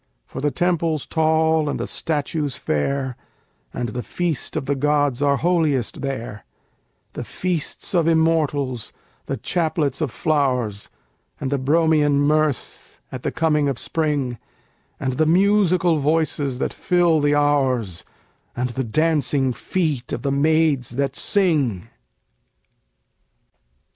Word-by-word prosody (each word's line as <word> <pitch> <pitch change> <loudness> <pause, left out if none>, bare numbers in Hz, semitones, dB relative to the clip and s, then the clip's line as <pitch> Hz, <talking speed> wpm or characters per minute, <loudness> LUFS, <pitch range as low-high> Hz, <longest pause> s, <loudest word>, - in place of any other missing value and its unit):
For 130 - -7
the 145 - +2
temples 165 -2 0
tall 160 -1 +2
and - - -3
the - - -2
statues 150 -2 -2
fair, 130 - -1 0.6
And 120 - -3
the 125 +4 -4
feasts 170 +2 -2
of - - -3
the 140 - 0
gods 145 -1 +1
are 140 -1 +3
holiest 155 -7 0
there; 120 -6 -5 0.7
The - - -5
feasts 180 +2 -3
of 170 -3 +2
Immortals, 155 -7 +1 0.4
the - - -2
chaplets 155 -4 -1
of 155 - 0
flowers, 125 -8 -1 0.5
And 135 - -3
the 140 - 0
Bromian 150 +1 +3
mirth 150 -1 -1
at 130 - -6
the - - -2
coming 150 -3 +1
of 135 - -2
spring, 145 -8 -1 0.6
And 130 -2 -2
the 155 - +3
musical 180 -2 +3
voices 145 -3 0
that - - -2
fill 175 -3 +2
the 145 0 +2
hours, 130 - +1 0.5
And 125 +1 -1
the 130 +2 -3
dancing 140 0 +1
feet 150 - -2
of - - -4
the 140 - 0
maids 150 -2 +2
that 140 0 -1
sing! 145 - +1
145 Hz, 130 wpm, -22 LUFS, 130-160 Hz, 0.7 s, are